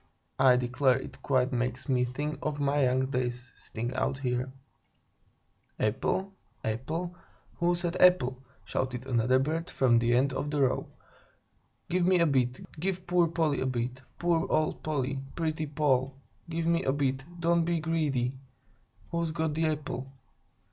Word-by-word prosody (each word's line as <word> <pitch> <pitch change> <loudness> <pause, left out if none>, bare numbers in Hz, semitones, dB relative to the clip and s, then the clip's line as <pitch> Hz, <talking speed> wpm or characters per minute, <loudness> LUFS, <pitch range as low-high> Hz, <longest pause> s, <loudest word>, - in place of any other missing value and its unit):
I 130 -1 +7
declare 125 +1 +2
it - - -9
quite 130 -1 +1
makes 125 +2 -2
me 125 -2 +2
think 145 +5 -4
of 150 -1 -2
my 140 0 +2
young 130 +1 +2
days, 125 -1 -2
sitting 120 +3 -5
out 135 - 0
here." 125 -1 -2 1.3
"Apple? 185 - 0 0.3
Apple? 160 +11 -3 0.4
Who 175 +1 +2
said 175 0 -2
apple?" 130 -9 +5 0.2
shouted 130 -1 -2
another 125 0 +3
bird 160 +5 -1
from 120 -3 +3
the 120 +1 +2
end 135 +2 +2
of 145 - -2
the 145 -1 0
row. 130 -1 +1 1.0
"Give 180 0 +1
me 185 +1 +4
a 170 - +4
bit! 130 -4 +1 0.2
Give 185 +1 -2
poor 175 -1 +3
Polly 160 -3 0
a 130 - 0
bit! 125 0 -2 0.2
Poor 170 -1 +1
old 155 0 +1
Polly! 135 -3 -1 0.2
Pretty 155 -2 -1
Poll! 140 -3 +1 0.3
Give 165 0 -2
me 170 +1 +2
a 135 - +2
bit; 135 -1 0 0.2
don't 170 0 +3
be 170 0 0
greedy! 150 -6 0 0.8
Who's 170 -1 0
got 160 0 -1
the 160 +1 +1
apple?" 145 -3 -3
140 Hz, 155 wpm, -29 LUFS, 125-165 Hz, 1.3 s, I